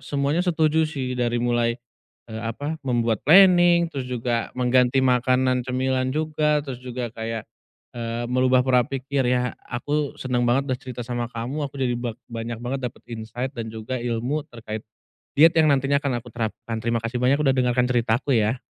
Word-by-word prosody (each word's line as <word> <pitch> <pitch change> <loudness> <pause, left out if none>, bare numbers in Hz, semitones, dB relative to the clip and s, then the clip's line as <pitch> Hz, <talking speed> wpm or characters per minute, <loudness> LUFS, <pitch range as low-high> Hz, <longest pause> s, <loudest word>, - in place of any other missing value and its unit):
semuanya 145 +4 0
setuju 160 -2 +2
sih, 130 -5 -3
dari 120 0 +1
mulai 120 -1 +1 0.5
eee, 110 +1 -6
apa, 145 +8 -3
membuat 120 -3 +1
planing, 175 0 +7
terus 130 -2 -3
juga 120 -1 -1
mengganti 125 +1 +3
makanan 125 0 +2
cemilan 130 0 0
juga, 150 -1 +1
terus 130 -3 -6
juga 125 -1 -4
kayak 115 -1 -4 0.5
eee 115 0 -3
merubah 130 0 +3
pora 125 -1 +4
pikir 135 -1 -1
ya. 125 0 +1 0.2
Aku 145 +4 -2
seneng 125 -2 0
banget 135 +3 +2
udah 125 - -2
cerita 125 -1 -6
sama 120 -1 -2
kamu, 125 +6 -4
aku 140 - -14
jadi 125 -2 +1
bak 120 -2 -4
banyak 115 0 -4
banget 135 +2 -3
dapet - - -21
insight 115 +4 -5
dan 115 -1 -4
juga 110 +3 -4
ilmu 120 +5 -1
terkait 110 -3 -7 0.6
diet 160 +3 +7
yang 155 -2 +5
nantinya 140 +1 +2
akan 130 -5 -1
aku - - -15
terapkan. 115 0 -4
Terima 115 0 +1
kasih 115 +2 -4
banyak 135 +3 +3
udah 135 -3 +3
dengarkan 125 -1 +2
cerita 120 -1 +2
aku 135 -2 0
ya. 110 +4 0
125 Hz, 175 wpm, -24 LUFS, 120-140 Hz, 0.6 s, planing